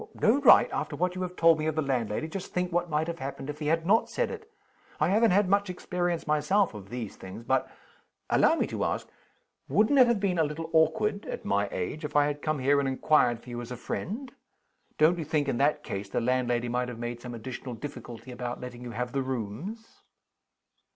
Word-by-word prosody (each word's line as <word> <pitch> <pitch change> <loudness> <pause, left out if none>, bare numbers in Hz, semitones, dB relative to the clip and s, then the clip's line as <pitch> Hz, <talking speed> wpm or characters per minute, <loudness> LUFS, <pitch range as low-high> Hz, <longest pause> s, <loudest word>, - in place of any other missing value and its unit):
"No 230 +6 +3
right? - - +8
After 145 - -2
what 180 +4 0
you 185 - -5
have 180 0 -4
told 165 -2 +5
me 155 - -1
of 155 - -1
the 155 - +1
landlady, 125 0 -1
just 185 +3 -6
think 180 0 -1
what 175 0 0
might 155 0 +1
have 170 0 -5
happened 135 +1 -5
if 150 - -12
he 150 - -3
had 165 +1 +1
not 220 +5 +3
said - - -1
it! 440 -1 -9 0.5
I 155 - +3
haven't 220 +4 +4
had 195 +1 +3
much 200 +1 +2
experience 175 -1 -2
myself 175 - +2
of 100 -2 -10
these 120 -3 -5
things. 95 +5 -9
But 130 +2 +1 0.6
allow - - +4
me - - +1
to - - -3
ask - - -1 0.6
wouldn't 220 +7 +4
it 250 - +8
have 235 -3 +2
been 190 -4 0
a - - +5
little 160 +2 -4
awkward 200 +6 +2
(at - - -5
my 100 0 +1
age) 150 - -4
if 150 - -5
I 145 0 +5
had 145 0 -3
come 155 0 0
here 140 +2 +3
and 135 -1 0
inquired 130 -3 +2
for 125 - -10
you 120 0 -4
as 120 - -8
a 125 - -5
friend? 240 - -5 0.7
Don't 165 +3 +4
you - - -2
think, 150 -1 0
in 125 - -1
that 150 +1 +2
case, 100 0 -5
the - - 0
landlady 120 0 0
might 125 +1 -1
have 120 - -7
made 120 0 -5
some 120 -1 -7
additional 125 +1 -6
difficulty 120 -1 -8
about 120 0 -5
letting 125 -1 -8
you 125 - -6
have 125 +1 -3
the 135 - 0
rooms?" 130 - -5
150 Hz, 225 wpm, -28 LUFS, 125-180 Hz, 0.7 s, right